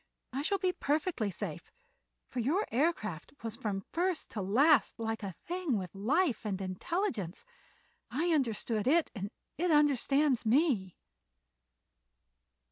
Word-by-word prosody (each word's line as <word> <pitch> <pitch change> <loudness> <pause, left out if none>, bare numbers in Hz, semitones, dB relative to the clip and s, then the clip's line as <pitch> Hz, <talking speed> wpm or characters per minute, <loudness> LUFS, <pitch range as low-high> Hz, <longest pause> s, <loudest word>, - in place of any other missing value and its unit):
I 270 - -1
shall 395 +7 +1
be 370 -1 +1
perfectly 295 - 0
safe, 190 - -6 0.6
for 255 - -5
your 310 - +1
aircraft 225 - -1
was 225 -1 -4
from 195 -4 -3
first 355 -1 0
to 210 - -3
last 245 +7 +4
like 225 0 -2
a 195 -4 -5
thing 350 -8 -1
with 185 -3 -5
life 255 - +1
and 200 -3 -2
intelligence. 195 - -2 0.6
I 310 +8 0
understand 230 -5 0
it, 325 +4 +3
and 200 -3 -4 0.3
it 355 +1 +2
understands 290 -3 +3
me." 230 - +2
255 Hz, 125 wpm, -32 LUFS, 210-320 Hz, 0.6 s, last